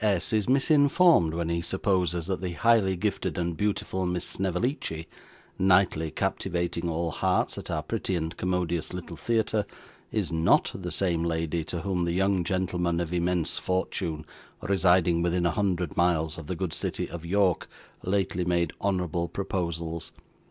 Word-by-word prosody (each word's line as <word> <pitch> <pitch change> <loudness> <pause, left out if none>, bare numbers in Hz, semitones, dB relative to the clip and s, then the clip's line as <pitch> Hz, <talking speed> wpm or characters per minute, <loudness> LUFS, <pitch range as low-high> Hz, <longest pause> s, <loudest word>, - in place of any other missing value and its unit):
S. 100 -1 +1
is 110 +1 +1
misinformed 145 - +4
when 85 -1 -1
he 85 0 0
supposes 90 -2 0
that 95 0 -2
the 90 -2 -3
highly 110 -2 +3
gifted 100 +1 -2
and 85 -1 -1
beautiful 95 -1 -1
Miss 90 0 -1
Snevellicci, 95 - -2 0.5
nightly 90 -4 +3
captivating 85 +2 -2
all 85 0 -1
hearts - - 0
at - - -9
our 75 - -1
pretty 95 +1 -2
and 80 -1 -3
commodious 90 -3 -1
little 85 -1 -7
theatre, 110 +2 0 0.5
is 105 -6 -1
NOT 80 0 +3
the 90 -2 -5
same 85 -1 0
lady 80 0 -1
to 85 0 -4
whom 90 -3 -1
the 85 - -1
young 95 0 +2
gentleman 90 -2 0
of 85 0 -3
immense 90 -1 0
fortune, 85 -4 -2 0.4
residing 90 -3 +3
within 85 0 +1
a 85 - +3
hundred 90 -2 -1
miles 80 -2 +2
of 80 - -9
the 90 - -2
good 85 -2 -3
city - - -2
of 85 -2 -8
York, 95 0 +1 0.3
lately 95 -1 0
made 85 -1 +1
honourable 90 -3 0
proposals. 85 -3 -3
90 Hz, 155 wpm, -27 LUFS, 85-95 Hz, 0.5 s, misinformed